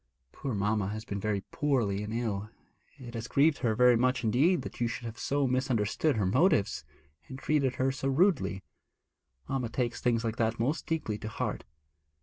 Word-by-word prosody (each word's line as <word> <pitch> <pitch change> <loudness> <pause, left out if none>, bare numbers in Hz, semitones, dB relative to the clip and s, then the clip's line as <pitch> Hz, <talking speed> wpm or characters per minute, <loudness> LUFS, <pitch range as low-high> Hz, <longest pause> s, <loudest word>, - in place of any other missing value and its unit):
Poor 130 -5 -4
mamma 105 0 0
has 110 +2 -5
been 100 -2 -4
very 100 -1 -1
poorly 120 -9 0
and 105 +1 -5
ill. 110 -3 -2 0.5
It 125 -4 -10
has 115 0 -5
grieved 145 +2 +3
her 110 -3 +1
very 125 +1 +6
much 125 +2 +1
indeed 140 - +3
that - - -8
you 120 - +3
should 120 +1 -5
have 115 0 -7
so 140 0 0
misunderstood 130 +2 +1
her 105 -3 +1
motives, 115 - +2 0.4
and 130 - -8
treated 135 -2 +1
her 130 +1 +1
so 135 0 -3
rudely. 135 - +2 0.8
Mamma 130 -3 -2
takes 120 0 -2
things 120 -1 +1
like 115 -1 -2
that 115 0 0
most 145 +8 -1
deeply 130 -10 -2
to - - -6
heart.' - - -3
120 Hz, 180 wpm, -30 LUFS, 110-135 Hz, 0.8 s, very